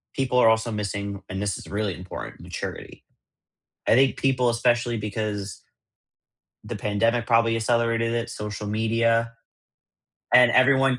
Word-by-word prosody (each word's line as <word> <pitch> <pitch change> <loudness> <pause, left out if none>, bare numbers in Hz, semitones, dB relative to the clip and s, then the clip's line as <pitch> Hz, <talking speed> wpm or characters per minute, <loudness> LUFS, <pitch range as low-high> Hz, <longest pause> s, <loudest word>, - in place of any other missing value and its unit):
people 125 -2 +1
are 115 - +6
also 110 +1 +1
missing, 100 -1 -4
and 95 +1 -4
this 100 -2 -2
is - - -12
really 105 -1 -2
important, 90 +2 -9
maturity. - - -7 0.9
I - - +6
think 135 +1 +3
people, 125 -2 +2
especially 120 0 +1
because 105 -2 -4 1.0
the - - -5
pandemic 115 +3 0
probably 115 -1 +3
accelerated 115 0 +1
it, 120 0 -2
social 105 0 -6
media, 115 +2 +1 1.0
and 125 -1 +7
everyone 130 0 +4
115 Hz, 130 wpm, -24 LUFS, 105-120 Hz, 1.0 s, and